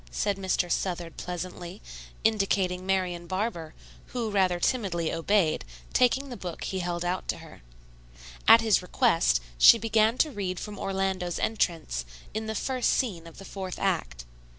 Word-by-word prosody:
said 200 - 0
Mr. 190 -2 -1
Southard 175 -3 -2
pleasantly, 180 +1 -6 0.4
indicating 195 -4 +1
Marian 180 -3 0
Barber, 185 -5 -3 0.3
who 235 -3 -3
rather 185 -3 +2
timidly 175 -7 0
obeyed, 165 0 +2 0.3
taking 265 +3 +3
the 245 - -6
book 180 -6 -6
he 190 - -3
held 175 -1 -2
out 180 +1 -2
to - - -1
her. - - -13 0.9
At 225 +1 +9
his 220 -4 +3
request, - - +2 0.2
she 230 - +9
began 225 +1 +2
to 310 - +2
read 190 -6 -3
from 210 -2 -7
Orlando's 190 -2 -1
entrance, 165 - -1 0.3
in 220 +1 -3
the 220 - -3
first 255 +2 0
scene 185 -11 -1
of 165 - -13
the 195 - -10
fourth 190 -2 -6
act. 170 - -2
190 Hz, 150 wpm, -27 LUFS, 175-215 Hz, 0.9 s, At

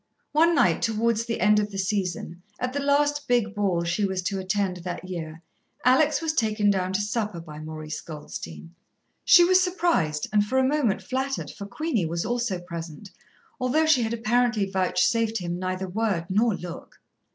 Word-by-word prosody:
One 330 +3 +4
night, 185 - +3
towards 230 0 +1
the 230 - -3
end 210 +3 +4
of 210 0 -1
the 195 - -7
season, 185 -3 -2 0.2
at 250 0 -2
the 285 - -1
last 290 +1 +1
big 240 -4 +1
ball 195 -5 0
she 175 +5 -1
was 190 -1 -1
to 195 +1 -2
attend 190 -1 -1
that 180 +1 -6
year, 165 -2 -6 0.4
Alex 295 +5 +4
was 320 -1 0
taken 215 -6 +2
down 185 -1 -1
to 190 - +1
supper 210 -3 -2
by 155 -2 -10
Maurice 155 0 -6
Goldstein. 80 - -9 0.5
She 350 - +8
was 370 +1 +5
surprised, 340 - 0
and 205 -1 +4
for 240 +6 -1
a 265 - +4
moment 270 -8 +1
flattered, 270 +1 -3
for 200 -1 -8
Queenie 235 - -1
was 170 +3 -2
also 240 -4 -1
present, 170 +1 -8 0.5
although 260 +5 +2
she 315 -5 +4
had 225 -1 -1
apparently 235 -1 +1
vouchsafed 215 +4 +1
him 175 -2 -4
neither 185 +1 -3
word 195 -3 -1
nor 215 +2 +2
look. 175 -2 -9
205 Hz, 175 wpm, -25 LUFS, 180-245 Hz, 0.5 s, She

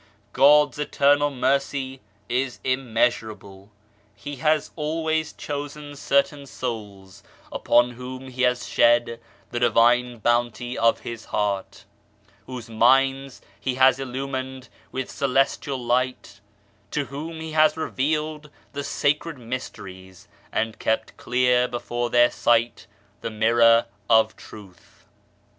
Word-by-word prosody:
God's 145 +1 +5
eternal 145 0 +2
Mercy 135 0 -1 0.3
is 125 +1 -2
immeasurable. 110 -6 -2 0.5
He 140 +8 -8
has 155 +1 +1
always 160 0 -1
INTERMEDIARY - - -11
POWER 145 0 -3
51 145 0 -10
chosen - - -12
certain 140 +1 0
souls 105 -8 -7 0.3
upon 120 +1 +3
whom 130 +2 -8
He 130 0 -6
has 125 0 +1
shed 120 0 +3 0.3
the 120 - -2
Divine 120 0 +3
Bounty 120 +2 0
of 115 0 +2
His 115 -1 -7
heart, 105 -1 -3 0.6
whose 125 -2 -7
minds 135 +4 +2 0.2
He 130 -1 -2
has 130 0 +5
illumined 130 0 -5 0.2
with 130 -1 -4
celestial 135 0 0
light, 125 -4 -2 0.5
to 145 +5 -2
whom 155 +4 -7
He 160 0 -6
has 155 0 +3
revealed 155 0 -2 0.2
the 140 0 -4
sacred 150 +3 -1
mysteries, 100 -7 -8 0.2
and 110 0 -2
kept 110 0 -1
clear 125 0 +2
before 120 0 -3
their 120 0 +4
sight 115 -3 +1 0.3
the - - -3
Mirror 115 +1 +4 0.2
of 110 -1 +4
Truth. 95 -5 -15
125 Hz, 120 wpm, -24 LUFS, 115-140 Hz, 0.6 s, God's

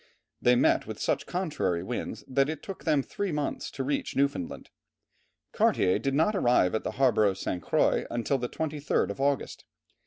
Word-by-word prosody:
They 125 0 +5
met - - +3
with - - -6
such - - -1
contrary 150 - -1
winds 115 0 -5
that 135 +2 +2
it 155 -2 -5
took 195 - -8
them 150 -4 +2
three 200 +5 -3
months 150 -1 -2
to 135 - -4
reach 140 +2 -2
Newfoundland. 140 -10 -1 0.8
Cartier 90 - +2
did 135 0 -1
not 165 +8 +2
arrive 120 - +3
at 110 - -1
the - - -3
harbour 125 -5 +4
of 95 -2 +1
St. 90 -2 -3
Croix - - +1 0.2
till 140 - +1
the 125 0 -3
23rd 150 -2 -1
of 135 - -6
August. 140 -1 -1
135 Hz, 180 wpm, -28 LUFS, 120-150 Hz, 0.8 s, They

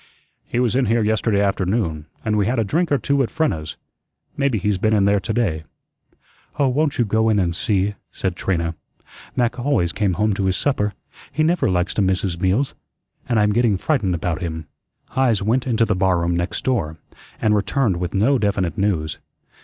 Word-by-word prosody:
"He 120 - -1
was 125 -2 +1
in 130 -2 +2
here 115 +1 +2
yesterday 105 -1 +1
afternoon, 95 -5 -1 0.2
and 105 -1 +1
we 105 -2 +2
had 125 +2 0
a 115 - +2
drink 165 - 0
or 145 - +4
two 140 +4 +1
at 125 - 0
Frenna's. 80 - -2 0.6
Maybe 140 -5 +1
he's 100 -1 0
been 110 +1 +2
in 100 -2 +3
there 100 0 +3
to 100 - -4
day." 100 -9 0 0.9
"Oh, 140 -2 +3
won't 145 +3 0
you 120 - +2
go 110 +2 +2
in 110 - +3
and 85 -3 +1
see?" 100 +1 0 0.2
said 95 -3 -3
Trina. 85 -3 -1 0.6
"Mac 125 -1 0
always 120 -10 +1
came 100 -1 0
home 105 +3 +1
to 95 0 -1
his 95 -1 +1
supper 105 -8 0 0.4
he 155 - 0
never 170 - +2
likes 90 0 0
to - - 0
miss 95 -1 +1
his 85 -3 -3
meals 105 +9 +1 0.6
and 120 -3 +3
I'm 105 0 +3
getting 115 -3 +2
frightened 105 - 0
about 85 +1 -2
him." 80 -2 -4 0.4
Heise 120 -6 +1
went 120 +5 +1
into 115 -2 +2
the 105 - +1
barroom 85 -2 +1
next 85 +1 -2
door, 80 -12 0 0.4
and 110 - +2
returned 105 -1 +1
with 90 +1 -3
no 125 +7 +3
definite 100 -6 -1
news. 85 -7 0
105 Hz, 195 wpm, -21 LUFS, 95-120 Hz, 0.9 s, or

